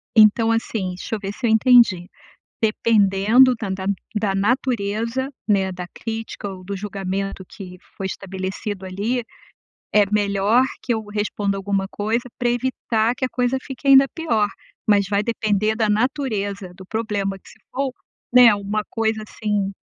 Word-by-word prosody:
Então, 225 +1 +6
assim, 225 -4 -1
deixa 220 - -4
eu - - -5
ver 200 0 -5
se 240 - -4
eu - - +2
entendi, 220 -6 +5 0.5
dependendo 220 +3 +4
da 215 -4 -5
da 190 0 -4 0.3
da 200 -2 0
natureza, 230 +3 0 0.2
né, 195 -2 +2
da 180 -1 -6
crítica 225 -2 -5
ou 185 -1 -9
do 200 +1 -4
julgamento 195 -1 -4
que 180 -2 -10 0.2
foi 195 - -3
estabelecido 190 +1 -5
ali, 210 +7 -2 0.7
é 210 -1 +5
melhor 205 +3 +3 0.2
que 240 - 0
eu 220 -1 -3
responda 205 -1 -2
alguma 195 0 -1
coisa 220 +4 -1 0.2
pra 245 -1 +1
evitar 240 -2 0
que 260 - -3
a - - -6
coisa 250 +2 0
fique 270 +1 -9
ainda 275 0 +8
pior, 225 -11 +1 0.4
mas 200 -2 +4
vai 200 0 +2
depender 215 -1 0
da 220 -2 +1
natureza 210 -6 -1
do 190 0 -13
problema, 205 -3 -2
que - - -19
se - - -18
for, 270 0 -2 0.4
né, 240 -4 +8
uma 205 +1 -2
coisa 220 -1 -1
assim 205 -2 -2
210 Hz, 155 wpm, -22 LUFS, 195-230 Hz, 0.7 s, ainda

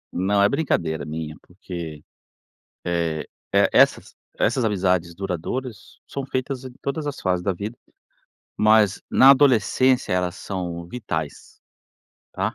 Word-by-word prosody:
Não, 100 +3 +2
é - - +6
brincadeira 100 - -1
minha 80 0 -5
porque 85 -5 -8 0.8
é 85 -2 -1 0.3
é - - +4
essas - - +3 0.2
essas 125 - +1
amizades 90 -4 +1
duradouras 100 +6 -5
são 140 -1 -5
feitas 130 0 -3
em 130 - -8
todas 145 +2 -3
as 145 - -4
fases 90 -1 0
da 95 - +1
vida 105 +6 -6 0.8
mas 110 -2 +4
na 135 - +8
adolescência 130 -2 +3
elas 90 -1 0
são 85 -3 -5
vitais, 85 -8 -5 0.7
tá, - - -2
95 Hz, 125 wpm, -23 LUFS, 85-125 Hz, 0.8 s, na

